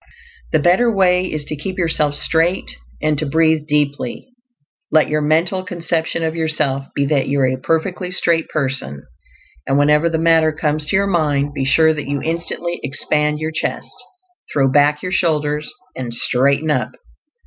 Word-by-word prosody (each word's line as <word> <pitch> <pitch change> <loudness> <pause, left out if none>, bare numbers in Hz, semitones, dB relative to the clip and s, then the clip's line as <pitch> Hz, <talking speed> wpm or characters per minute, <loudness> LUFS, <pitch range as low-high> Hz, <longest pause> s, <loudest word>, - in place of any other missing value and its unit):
This 155 -2 +1
better 190 +7 +4
way 185 -2 +2
is 155 -2 -4
to 155 - -4
keep 185 +6 -5
yourself 155 -4 +1
straight, 165 +4 +1 0.3
and 150 -1 +1
to 155 - -1
breathe 160 0 +2
deeply. 145 - -2 0.6
Let 155 -1 +3
your 155 0 0
mental 165 +5 +1
conception 165 -2 -2
of 160 0 -2
yourself 150 -4 -1
be 140 - +1
that 140 -1 +1
you 140 +1 0
are - - +4
a 130 - 0
perfectly 180 +4 -1
straight 170 -2 0
person, 130 - -3 0.6
and 135 - +2
whenever 150 +3 +3
the 165 - -1
matter 160 -1 +3
comes 155 -1 -1
to - - 0
your 195 +1 +3
mind, 145 -6 0
be 135 -2 -2
sure 160 +3 +4
that 150 -2 -5
you 145 0 -1
instantly 170 +2 -3
expand 150 +2 0
your 155 +1 -3
chest, 160 - -3 0.6
throw 135 -2 +2
back 145 +2 +2
your 180 - -3
shoulders, 150 -4 0 0.3
and 120 -2 -3
"straighten 140 +6 +2
up." - - -1
155 Hz, 170 wpm, -18 LUFS, 145-165 Hz, 0.6 s, better